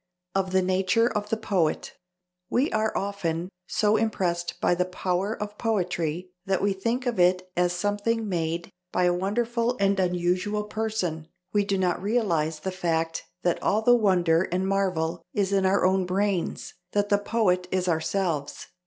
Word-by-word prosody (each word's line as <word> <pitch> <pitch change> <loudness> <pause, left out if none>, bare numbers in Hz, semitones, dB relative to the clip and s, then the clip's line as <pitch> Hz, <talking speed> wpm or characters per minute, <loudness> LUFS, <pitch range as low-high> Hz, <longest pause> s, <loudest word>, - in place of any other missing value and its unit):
Of 190 -1 0
the 190 0 +3
nature 185 +5 +2
of 210 -3 -2
the 225 - 0
poet: 190 -8 0 0.6
"We 265 +4 +1
are 220 0 +1
(often) 180 -4 -2 0.2
so 210 0 +2
impressed 180 -6 -1
by - - +3
the 180 +1 +1
power 185 +3 -2
of 210 0 -6
poetry 180 -5 -1 0.2
that 195 -1 +2
we 200 0 +1
think 230 +6 -2
of 240 -5 -1
it 185 +1 +3
as 175 0 +2
something 205 +4 -1
made 170 -2 -2 0.2
by 180 - +1
a 175 0 +4
wonderful 235 +6 0
and 195 0 +2
unusual 180 +3 0
person: 210 -7 -3 0.3
we 205 -1 +3
do 200 -1 0
not 180 -2 0
realize 170 -8 0
the 190 - -2
fact 165 -3 -1 0.2
that 175 -1 +1
all 215 +2 +1
the 245 - +6
wonder 185 -6 +3
and 185 +2 0
marvel 180 -4 0
is 200 -1 +1
in 195 -1 +3
our 190 0 +3
own 190 0 +2
brains, 195 -1 -1 0.2
that 205 0 +1
the 205 - +3
poet 195 -4 +1
is 185 0 0
ourselves. 160 -2 -1
190 Hz, 165 wpm, -26 LUFS, 175-210 Hz, 0.6 s, the